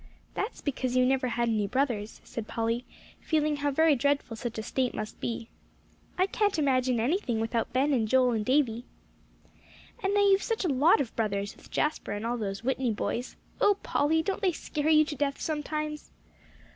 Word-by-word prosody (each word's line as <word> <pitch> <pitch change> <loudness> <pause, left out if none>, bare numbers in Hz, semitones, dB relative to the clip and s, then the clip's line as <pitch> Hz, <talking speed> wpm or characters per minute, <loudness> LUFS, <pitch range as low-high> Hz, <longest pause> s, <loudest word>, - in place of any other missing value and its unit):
"That's 425 - -4
because 255 -3 -2
you 255 - +5
never 260 0 +2
had 235 0 0
any 215 -3 +1
brothers," 240 -4 -1
said 225 -2 -6
Polly, 230 +2 -1 0.3
feeling 305 -2 0
how 290 0 0
very 315 +2 +4
dreadful 280 -2 0
such 230 0 -5
a 220 - -3
state 255 +2 -1
must 215 0 -5
be. 230 -1 -3 0.7
"I 370 - +4
can't 410 -1 0
imagine 255 -4 +2
anything 245 - 0
without 225 0 -1
Ben 275 +3 +2
and 225 -4 +1
Joel 255 +1 +4
and 220 -2 0
Davie." 245 -2 +1 1.2
"And 390 +1 0
now 410 - +4
you've 395 -1 +5
such 450 -4 -1
a - - +1
lot 285 +4 +4
of 245 - -5
brothers, 200 -2 -1
with - - -17
Jasper 300 -8 -1
and 205 +2 -4
all 240 +1 -1
those 195 0 -4
Whitney 260 0 0
boys; 235 +3 -3 0.2
oh, 410 -1 +4
Polly, 320 +3 +2
don't 390 +2 -2
they 375 -4 +2
scare 305 -1 -2
you 310 -1 +6
to 295 - -5
death 280 0 -1
sometimes?" 305 0 -3
260 Hz, 185 wpm, -28 LUFS, 230-305 Hz, 1.2 s, you